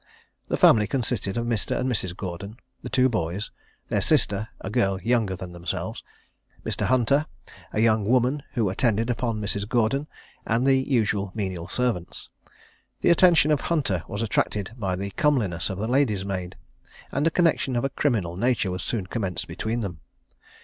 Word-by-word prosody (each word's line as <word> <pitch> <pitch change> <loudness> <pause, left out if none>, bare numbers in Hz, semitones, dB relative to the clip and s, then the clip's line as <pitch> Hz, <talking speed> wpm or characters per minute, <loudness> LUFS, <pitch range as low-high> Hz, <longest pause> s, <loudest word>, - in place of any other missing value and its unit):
The - - -1
family 105 -2 +6
consisted 120 -5 -1
of 115 - -1
Mr. 115 -3 0
and 125 - 0
Mrs. 95 -7 -2
Gordon, 100 +4 -6 0.2
the - - -6
two 130 0 +4
boys, 100 -3 -2 0.4
their - - +1
sister 100 +2 +3
(a 95 - -6
girl 100 -5 +1
younger 110 -2 +1
than 90 0 -8
themselves), 85 -1 -4 0.6
Mr. - - -1
Hunter, 130 +4 +2 0.4
a - - -2
young 110 -2 +3
woman 130 +4 +2
who 115 -4 +1
attended 115 +3 +1
upon 115 -2 -2
Mrs. 100 0 -2
Gordon, 120 +5 +1 0.4
and 115 +3 +1
the 135 - +5
usual 110 -7 0
menial 95 -5 -3
servants. 115 -5 -2 0.7
The - - +4
attention 170 -3 +5
of 150 - +2
Hunter 135 - 0
was 105 +3 -3
attracted 105 -2 0
by 95 -6 -2
the 100 +2 -4
comeliness 105 - +1
of 95 - -4
the 110 +3 -2
lady's 120 -7 +1
maid, 90 -2 -4 0.6
and 150 - +1
a - - +5
connexion 165 -6 +1
of 120 - 0
a - - 0
criminal 115 - 0
nature 115 -2 +1
was 90 0 -3
soon 105 -1 -2
commenced 95 -2 -3
between 110 +8 -3
them. 90 -7 -5
110 Hz, 170 wpm, -25 LUFS, 95-125 Hz, 0.7 s, family